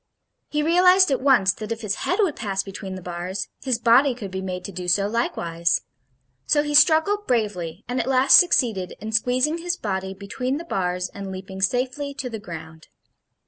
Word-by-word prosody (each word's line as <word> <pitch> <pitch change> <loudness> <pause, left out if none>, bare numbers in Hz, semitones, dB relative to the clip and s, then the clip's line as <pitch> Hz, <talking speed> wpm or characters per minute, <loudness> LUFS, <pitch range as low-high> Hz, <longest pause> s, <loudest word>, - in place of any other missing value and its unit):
He 300 0 -1
realized 360 +2 +5
at 270 - 0
once 245 -9 +4
that 215 +2 -8
if 225 0 -4
his 210 -3 -1 0.2
head 365 - +1
would 335 -7 0
pass 195 -4 -2
between 195 -1 -7
the 185 - -9
bars, 180 +3 -5
his 260 -3 0
body 245 +3 +4
could 205 -6 -7
be 190 0 -4
made 180 -1 -5
to - - -6
do 180 -1 -7
so, 195 +3 +2
likewise. 170 -7 -1 0.7
So 295 - +3
he 295 0 -3
struggled 325 +7 +4
bravely, 205 -7 -2
and 250 +1 -2
at 240 - -2
last 265 0 +6
succeeded 225 - +1
in 215 +3 -6
squeezing 255 +8 +1
his 350 +1 -2
body 190 -2 -4
between 250 +7 -4
the 335 - -7
bars 180 - -2
and 195 -1 -8
leaping 190 0 -8
safely 260 +7 -1
to 265 -2 -5
the 220 - -5
ground. 160 -4 -10
220 Hz, 190 wpm, -23 LUFS, 190-270 Hz, 0.7 s, last